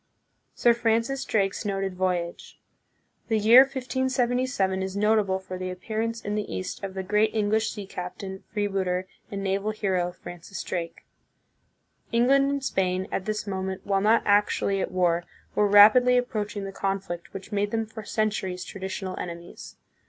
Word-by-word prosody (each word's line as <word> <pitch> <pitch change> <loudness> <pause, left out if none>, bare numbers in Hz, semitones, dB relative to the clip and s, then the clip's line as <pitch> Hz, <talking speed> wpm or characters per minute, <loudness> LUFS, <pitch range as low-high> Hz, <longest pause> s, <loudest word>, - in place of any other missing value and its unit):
Sir 240 - +4
Francis 230 +3 0
Drake's 195 -2 0
Noted 195 -2 -2
Voyage. 180 -2 -3 0.7
The 225 - +2
year 220 +4 +8
1577 255 -6 0
is 190 +1 -3
notable 210 -2 +2
for 185 -1 -7
the 185 0 -3
appearance 220 +5 -3
in 205 - -3
the 210 0 -3
East 95 - -5
of 195 -1 -5
the 190 - -3
great 210 +3 +1
Eng 210 -1 +1
lish 220 0 +2
sea 205 -2 -6
captain, 190 +1 -7
freebooter, 195 -3 -1 0.2
and 200 -1 -4
naval 195 +2 0
hero, 190 -4 -1
Francis 175 +1 -8
Drake. 170 -2 -5 1.1
England 270 +4 +4
and 280 -1 -2
Spain, 185 -5 0
at 190 - -2
this 215 -1 -2
moment, 190 -1 -4
while 195 -1 +1
not 220 +3 +4
actually 205 -1 +2
at - - -2
war, 175 -2 +2 0.3
were 210 - +3
rapidly 220 +5 +7
approaching 210 -4 -2
the 195 - -5
conflict 195 -3 -3
which 195 +3 -9
made 205 0 0
them 225 +1 -1
for 220 0 -9
centuries 200 -4 -1
traditional 190 0 -5
enemies. 170 0 -8
200 Hz, 155 wpm, -26 LUFS, 190-220 Hz, 1.1 s, year